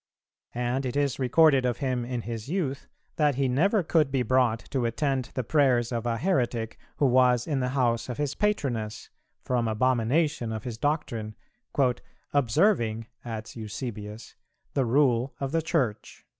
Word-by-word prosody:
And 125 Hz, +2 st, -1 dB
it 125 Hz, -1 st, -3 dB
is 145 Hz, -2 st, 0 dB
recorded 135 Hz, +1 st, +4 dB
of 125 Hz, -2 st, 0 dB
him 130 Hz, -3 st, -1 dB
in 120 Hz, -1 st, -3 dB
his 115 Hz, +1 st, -6 dB
youth, 150 Hz, -7 st, -2 dB, 0.3 s
that 150 Hz, -3 st, +3 dB
he 135 Hz, 0 st, +1 dB
never 180 Hz, -, +2 dB
could 155 Hz, -3 st, +2 dB
be 135 Hz, -2 st, +1 dB
brought 125 Hz, -1 st, +3 dB
to 130 Hz, -3 st, 0 dB
attend 130 Hz, +2 st, 0 dB
the 130 Hz, -, -1 dB
prayers 125 Hz, -4 st, +2 dB
of 120 Hz, -1 st, -2 dB
a 115 Hz, -1 st, 0 dB
heretic 120 Hz, -, -1 dB, 0.2 s
who 145 Hz, -, +2 dB
was 125 Hz, -2 st, +4 dB
in 145 Hz, -4 st, -1 dB
the 125 Hz, -1 st, 0 dB
house 120 Hz, -2 st, +1 dB
of 125 Hz, -, -4 dB
his 145 Hz, -2 st, -1 dB
patroness, 120 Hz, -, -2 dB, 0.3 s
from 120 Hz, -2 st, 0 dB
abomination 125 Hz, +4 st, +1 dB
of 110 Hz, -1 st, -4 dB
his 115 Hz, -3 st, -6 dB
doctrine, 120 Hz, -8 st, -2 dB, 1.0 s
"observing," 120 Hz, -, +2 dB, 0.2 s
adds 110 Hz, -2 st, -6 dB
Eusebius, 110 Hz, -1 st, -6 dB, 0.4 s
"the 135 Hz, -, +1 dB
rule 125 Hz, 0 st, +2 dB
of 135 Hz, -1 st, -3 dB
the 165 Hz, +1 st, +1 dB
Church." 135 Hz, -10 st, -2 dB
125 Hz, 155 wpm, -27 LUFS, 115-140 Hz, 1.0 s, recorded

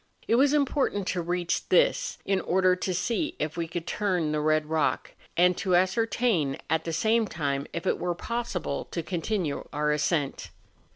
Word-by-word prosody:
It -, -, +2 dB
was 270 Hz, +4 st, +5 dB
important 280 Hz, -8 st, +1 dB
to 180 Hz, -, -1 dB
reach 175 Hz, 0 st, -2 dB
this -, -, +3 dB
in 195 Hz, -1 st, +1 dB
order 185 Hz, +2 st, +3 dB
to 185 Hz, +1 st, -3 dB
see 230 Hz, -, -1 dB
if 155 Hz, 0 st, -3 dB
we 170 Hz, -1 st, -2 dB
could 170 Hz, 0 st, -5 dB
turn 180 Hz, -6 st, 0 dB
the 150 Hz, 0 st, 0 dB
red 155 Hz, 0 st, +2 dB
rock, 155 Hz, 0 st, 0 dB, 0.3 s
and 180 Hz, +1 st, +5 dB
to 185 Hz, -2 st, +1 dB
ascertain 190 Hz, -, +1 dB
at 160 Hz, 0 st, +1 dB
the 165 Hz, -, -2 dB
same 220 Hz, +7 st, +2 dB
time 140 Hz, -5 st, -2 dB
if 170 Hz, -, -5 dB
it -, -, +1 dB
were 175 Hz, -1 st, -1 dB
possible 230 Hz, -8 st, -3 dB
to 170 Hz, -, -4 dB
continue 175 Hz, -2 st, -2 dB
our 150 Hz, 0 st, 0 dB
ascent. 150 Hz, -1 st, -1 dB
180 Hz, 175 wpm, -27 LUFS, 160-220 Hz, 0.3 s, was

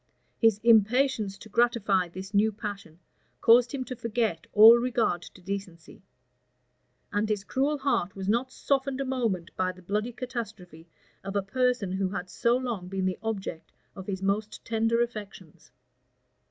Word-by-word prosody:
[*] -, -, -43 dB
His 225 Hz, -3 st, +5 dB
impatience 225 Hz, -1 st, +3 dB
to 220 Hz, -, -13 dB
gratify 215 Hz, -5 st, +2 dB
this 190 Hz, +4 st, -9 dB
new 210 Hz, +2 st, +3 dB
passion 200 Hz, -6 st, -7 dB, 0.4 s
caused 240 Hz, +1 st, +5 dB
him 275 Hz, -3 st, -3 dB
to 255 Hz, -, -7 dB
forgot 225 Hz, -7 st, -2 dB
all 220 Hz, +3 st, +9 dB
regard 235 Hz, -8 st, 0 dB
to 180 Hz, +2 st, -14 dB
decency; 195 Hz, 0 st, -7 dB, 1.1 s
and 210 Hz, +1 st, 0 dB
his 210 Hz, -2 st, -1 dB
cruel 275 Hz, +8 st, 0 dB
heart 265 Hz, -10 st, -1 dB
was 190 Hz, -1 st, -5 dB
not 240 Hz, +5 st, +1 dB
softened 270 Hz, 0 st, -1 dB
a 275 Hz, -, -1 dB
moment 230 Hz, -10 st, -2 dB
by 185 Hz, 0 st, 0 dB
the 185 Hz, 0 st, -16 dB
bloody 210 Hz, +6 st, -2 dB
catastrophe 220 Hz, -9 st, -7 dB, 0.4 s
of 195 Hz, +1 st, -6 dB
a 200 Hz, -, +1 dB
person 250 Hz, -1 st, 0 dB
who 190 Hz, 0 st, -1 dB
had 185 Hz, -2 st, -5 dB
so 235 Hz, +1 st, +2 dB
long 235 Hz, -8 st, -4 dB
been 190 Hz, 0 st, -2 dB
the 185 Hz, -1 st, -1 dB
object 195 Hz, -7 st, -5 dB, 0.2 s
of 190 Hz, -1 st, -9 dB
his 195 Hz, -1 st, -4 dB
most 205 Hz, +2 st, -2 dB
tender 230 Hz, +1 st, +1 dB
affections. 205 Hz, -8 st, -9 dB
210 Hz, 160 wpm, -27 LUFS, 190-240 Hz, 1.1 s, all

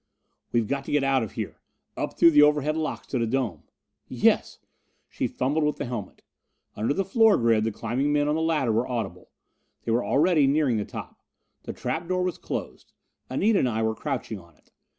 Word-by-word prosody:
"We've 115 Hz, -3 st, +1 dB
got 140 Hz, +2 st, -2 dB
to -, -, -6 dB
get 145 Hz, -1 st, +2 dB
out 135 Hz, -1 st, +2 dB
of 110 Hz, -, -5 dB
here! -, -, -6 dB, 0.3 s
Up -, -, -4 dB
through 170 Hz, -, +7 dB
the 150 Hz, -1 st, +6 dB
overhead 150 Hz, 0 st, +3 dB
locks 160 Hz, -1 st, -3 dB
to 130 Hz, -, -1 dB
the 115 Hz, -, 0 dB
dome." 115 Hz, -, -2 dB, 0.4 s
"Yes -, -, +2 dB, 0.3 s
" -, -, -45 dB
She -, -, -1 dB
fumbled 145 Hz, +5 st, -1 dB
with 150 Hz, 0 st, 0 dB
the -, -, -3 dB
helmet. 120 Hz, -5 st, -6 dB, 0.5 s
Under 110 Hz, +5 st, -1 dB
the 195 Hz, +6 st, 0 dB
floor 220 Hz, +1 st, +4 dB
grid 115 Hz, -2 st, +2 dB
the 115 Hz, -, 0 dB
climbing 120 Hz, +7 st, -1 dB
men 145 Hz, 0 st, +2 dB
on 150 Hz, -, +2 dB
the 160 Hz, -, 0 dB
ladder 155 Hz, -7 st, +1 dB
were 115 Hz, +3 st, +1 dB
audible. 115 Hz, -8 st, -4 dB, 0.6 s
They 115 Hz, -, -1 dB
were 120 Hz, +2 st, +2 dB
already 155 Hz, 0 st, +3 dB
nearing 140 Hz, -4 st, +2 dB
the 105 Hz, -, -2 dB
top. -, -, -9 dB, 0.4 s
The -, -, -5 dB
trap 135 Hz, +7 st, -3 dB
door 185 Hz, 0 st, 0 dB
was 180 Hz, -1 st, -2 dB
closed: -, -, -6 dB, 0.4 s
Anita 200 Hz, +10 st, +2 dB
and 125 Hz, -, +2 dB
I 110 Hz, -1 st, -1 dB
were 110 Hz, 0 st, +1 dB
crouching 120 Hz, -5 st, -4 dB
on 85 Hz, -3 st, -19 dB
it. -, -, -32 dB
135 Hz, 210 wpm, -26 LUFS, 115-155 Hz, 0.6 s, through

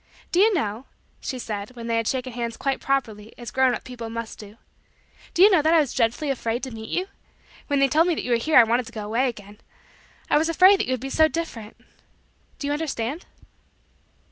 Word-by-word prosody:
"Do 350 Hz, -, +2 dB
you 435 Hz, +3 st, +6 dB
know" 225 Hz, -5 st, -2 dB, 0.3 s
she 260 Hz, -, -5 dB
said 210 Hz, 0 st, -6 dB
when 235 Hz, -1 st, -8 dB
they 230 Hz, 0 st, 0 dB
had 230 Hz, -1 st, -1 dB
shaken 255 Hz, -1 st, -2 dB
hands 235 Hz, -1 st, -4 dB
quite 275 Hz, -1 st, -1 dB
properly 225 Hz, -6 st, -2 dB
as 240 Hz, -2 st, -8 dB
grown 260 Hz, -2 st, +3 dB
up -, -, -8 dB
people 240 Hz, -3 st, -8 dB
must 230 Hz, 0 st, -6 dB
do 210 Hz, +1 st, -12 dB, 0.8 s
"do 355 Hz, -, +6 dB
you 415 Hz, -, +8 dB
know 360 Hz, -5 st, +5 dB
that 320 Hz, +3 st, +3 dB
I -, -, +6 dB
was 290 Hz, -5 st, 0 dB
dreadfully 245 Hz, +5 st, 0 dB
afraid 235 Hz, -2 st, -2 dB
to 260 Hz, -, -4 dB
meet 220 Hz, -1 st, -8 dB
you? 365 Hz, -, -1 dB, 0.6 s
When 285 Hz, -, +1 dB
they 275 Hz, 0 st, +4 dB
told 315 Hz, +6 st, +3 dB
me 345 Hz, -, +1 dB
that -, -, -4 dB
you 250 Hz, -, -3 dB
were 235 Hz, -, +4 dB
here 305 Hz, +7 st, +2 dB
I 245 Hz, -, +10 dB
wanted 235 Hz, +1 st, 0 dB
to -, -, -10 dB
go 215 Hz, -2 st, -5 dB
away 235 Hz, +5 st, +1 dB
again. 210 Hz, -2 st, -11 dB, 0.7 s
I -, -, +3 dB
was 320 Hz, +2 st, 0 dB
afraid 370 Hz, +4 st, +6 dB
that -, -, -1 dB
you 255 Hz, -, 0 dB
would 255 Hz, -, -2 dB
be 270 Hz, +3 st, -6 dB
so 315 Hz, +2 st, +5 dB
different. 255 Hz, -8 st, -6 dB, 0.8 s
Do -, -, -6 dB
you 290 Hz, -, 0 dB
understand?" 295 Hz, 0 st, -3 dB
255 Hz, 230 wpm, -24 LUFS, 230-300 Hz, 0.8 s, I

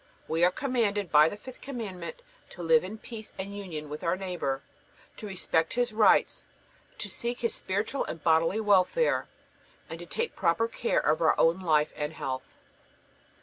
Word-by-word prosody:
We 165 Hz, +2 st, +1 dB
are 180 Hz, -, +7 dB
commanded 210 Hz, -, -1 dB
by 150 Hz, +1 st, +7 dB
the 205 Hz, -, -7 dB
fifth 255 Hz, +4 st, -11 dB
Commandment 245 Hz, -, -6 dB, 0.3 s
to -, -, -9 dB
live 475 Hz, -1 st, +5 dB
in 220 Hz, -, -6 dB
peace 220 Hz, -1 st, -9 dB
and 195 Hz, +1 st, -5 dB
union 170 Hz, -7 st, -6 dB
with 150 Hz, +1 st, -7 dB
our 170 Hz, +2 st, +1 dB
neighbor, 175 Hz, -8 st, -3 dB, 0.5 s
to 215 Hz, -, -7 dB
respect 175 Hz, -3 st, 0 dB
his 245 Hz, -2 st, 0 dB
rights, 215 Hz, -1 st, +4 dB, 0.5 s
to -, -, -4 dB
seek 240 Hz, 0 st, -3 dB
his 235 Hz, -2 st, 0 dB
spiritual 205 Hz, +8 st, -2 dB
and 160 Hz, -, -7 dB
bodily 165 Hz, +5 st, +3 dB
welfare, 210 Hz, -, +3 dB, 0.6 s
and -, -, -6 dB
to -, -, -9 dB
take 465 Hz, +1 st, -2 dB
proper 190 Hz, +5 st, +2 dB
care 230 Hz, +1 st, 0 dB
of 155 Hz, -, +1 dB
our 160 Hz, -, +3 dB
own 165 Hz, +3 st, +4 dB
life 155 Hz, -5 st, +2 dB
and 150 Hz, +1 st, -3 dB
health. 130 Hz, -4 st, -5 dB
195 Hz, 170 wpm, -28 LUFS, 165-230 Hz, 0.6 s, are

